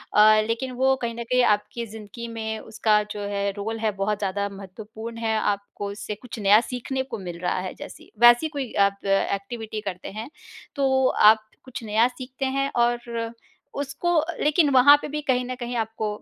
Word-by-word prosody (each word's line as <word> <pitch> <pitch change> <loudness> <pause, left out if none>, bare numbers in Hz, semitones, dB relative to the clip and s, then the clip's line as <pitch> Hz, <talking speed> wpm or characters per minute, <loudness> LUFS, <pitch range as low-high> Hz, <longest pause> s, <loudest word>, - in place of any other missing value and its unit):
अ, 215 +1 +7
लेकिन 235 +3 -2
वो 265 0 +4
कहीं 230 -1 -3
न 235 - -4
कहीं 250 +2 +2
आपकी 210 +3 -7
ज़िंदगी 220 +1 -9
में 220 -1 -4
उसका 215 -1 +1
जो 210 - -5
है 200 0 -1
रोल 225 +2 -3
है, 220 -1 +1
बहुत 205 +1 -1
ज़्यादा 200 0 -1
महत्वपूर्ण 215 +4 -9
है। 225 -1 -1
आपको 200 0 -2
उससे 210 +1 -6
कुछ 235 +2 -9
नया 205 +1 +6
सीखने 255 +2 -3
को 265 - -6
मिल 175 -3 -7
रहा 180 +1 -1
है 185 0 -5
जैसी। - - -12
वैसी 240 +5 +7
कोई 265 -4 -3 0.2
आप 200 0 -7
एक्टिविटी 200 +3 -1
करते 185 -3 -6
हैं, 220 +5 -7 0.5
तो 265 -2 +2 0.2
आप 220 0 -1 0.2
कुछ 245 -3 -8
नया 220 +2 +3
सीखते 255 +1 -6
हैं 275 0 +1
और 235 -1 0 0.5
उसको 285 +5 -2 0.3
लेकिन 300 0 +3
वहाँ 265 +3 +8
पे - - -5
भी 300 +1 -4
कहीं 255 -3 +1
न 255 +1 -4
कहीं 245 -1 -5
आपको 220 -1 -2
225 Hz, 185 wpm, -24 LUFS, 210-250 Hz, 0.5 s, वहाँ